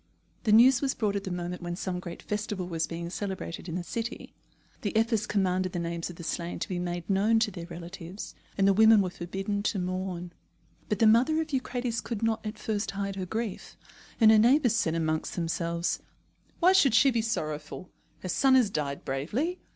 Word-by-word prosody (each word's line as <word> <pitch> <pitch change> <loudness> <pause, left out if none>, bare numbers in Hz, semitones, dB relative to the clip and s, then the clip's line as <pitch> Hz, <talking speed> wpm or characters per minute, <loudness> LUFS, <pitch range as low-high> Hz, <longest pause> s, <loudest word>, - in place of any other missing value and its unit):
The 215 - +3
news 240 +3 +7
was 275 -2 0
brought 210 -4 0
at 200 0 -3
the 190 - -4
moment 175 0 -4
when 175 0 -4
some 180 0 -3
great 175 -1 -8
festival 205 -3 -3
was 165 -2 -1
being 170 0 -5
celebrated 190 -3 -5
in 165 - -4
the 180 - -2
city. 230 +7 -5 0.5
The 205 - -3
Ephors 225 -1 +1
commanded 185 -2 0
the - - -2
names 170 0 -3
of 175 - -9
the 170 - -9
slain 170 +1 -3
to - - -3
be 180 -2 -3
made 175 -1 -4
known 205 +3 +3
to 220 -1 +2
their 170 -2 -7
relatives, 175 +2 -8 0.2
and 195 -1 +4
the 195 - +5
women 220 0 +6
were 185 - -3
forbidden 195 +4 -3
to 205 0 -1
mourn. 180 -1 -3 0.6
But 210 - +1
the 225 - +4
mother 245 +9 +5
of 315 -2 -3
Eucrates 245 -3 -1
could 230 -2 -4
not 225 0 0
at 215 0 -5
first 210 -1 -2
hide 195 0 -3
her 185 -1 -4
grief, 220 0 -4 0.4
and 220 -2 +7
her 220 - +7
neighbours 245 +1 +4
said 165 -7 +1
among 160 -1 0
themselves: 170 0 -1 0.6
"Why 365 +2 +6
should 275 - +5
she 265 +4 +6
be 235 -2 +1
sorrowful? 155 -6 -4 0.3
Her 185 - -5
son 265 +8 +4
has 240 -6 +4
died 140 -5 -3
bravely. 220 - -2
195 Hz, 205 wpm, -28 LUFS, 175-225 Hz, 0.6 s, news